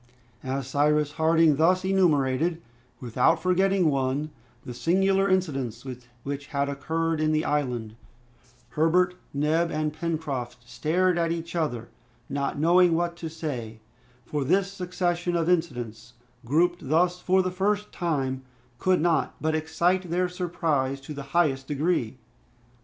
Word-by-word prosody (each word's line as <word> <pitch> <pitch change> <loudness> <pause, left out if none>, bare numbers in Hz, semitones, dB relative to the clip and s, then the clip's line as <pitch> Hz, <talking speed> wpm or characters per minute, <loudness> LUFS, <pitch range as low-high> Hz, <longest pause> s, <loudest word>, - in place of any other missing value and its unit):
As 130 0 -3
Cyrus 150 +2 +2
Harding 160 -1 +3
thus 180 +4 +3
enumerated, 165 -4 +2 0.4
without 125 +6 +2
forgetting 185 0 +2
one, 135 +3 -1 0.3
the 125 - -6
singular 195 +8 +2
incidents 135 - -1 0.4
which 140 0 -5
had 140 -1 -1
occurred 160 +3 -1
in 155 0 +2
the 155 0 +1
island, 125 -7 -1 0.7
Herbert, 170 +6 +2 0.2
Neb, 155 +4 +1
and 155 -1 -2
Pencroft 145 -7 -4
stared 175 +7 +1
at 165 -1 +1
each 170 0 -4
other, 120 -9 -2 0.4
not 140 0 -2
knowing 170 +2 +4
what 170 0 -1
to 165 - -5
reply, 130 -9 -5 0.5
for 145 +2 -2
this 190 +7 +1
succession 175 -2 -2
of 165 -1 0
incidents, 120 -10 -2 0.3
grouped 165 +3 +1
thus 175 +3 +2
for 185 +1 +2
the 185 - -2
first 205 +3 -1
time, 135 -7 -2 0.4
could 185 -2 +2
not 165 -3 +1
but 155 0 0
excite 170 +3 0
their 180 +2 +1
surprise 165 -7 -1
to 145 +3 -8
the 140 - -6 0.2
highest 135 -6 +2
degree. 145 -5 -1
160 Hz, 135 wpm, -26 LUFS, 140-175 Hz, 0.7 s, knowing